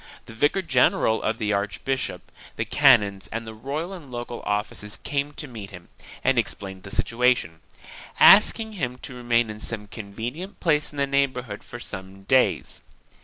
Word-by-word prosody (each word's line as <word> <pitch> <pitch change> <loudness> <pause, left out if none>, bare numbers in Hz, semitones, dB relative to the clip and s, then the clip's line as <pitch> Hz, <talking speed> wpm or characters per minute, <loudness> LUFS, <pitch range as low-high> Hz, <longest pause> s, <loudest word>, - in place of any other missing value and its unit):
The - - -11
vicar 145 +11 +1
general 125 -6 +3
of 110 0 -1
the 105 -1 0
archbishop, 105 +7 -2 0.2
the - - -2
canons 100 -2 +4
and 115 +1 -4
the 110 - -8
royal 145 - -4
and 165 -8 -10
local 120 -1 -6
officials 105 0 -2
came 140 0 -2
to 150 - -5
meet 110 -6 -8
him 90 -3 -12 0.3
and 135 -2 +3
explained 95 -3 -3
the 100 - -10
situation, 120 -8 +1 0.6
ask 210 +4 +8
ing 220 -1 -5
him 125 -10 -3
to 135 - -6
remain 120 -2 +1
in 105 - -9
some 110 -1 -4
convenient 120 - -7
place 150 -4 +2
in 145 - -12
the 140 - +2
neighborhood 130 -6 -1
for 120 - -9
some 95 -3 -8
days. 130 +5 +2
120 Hz, 170 wpm, -25 LUFS, 105-140 Hz, 0.6 s, ask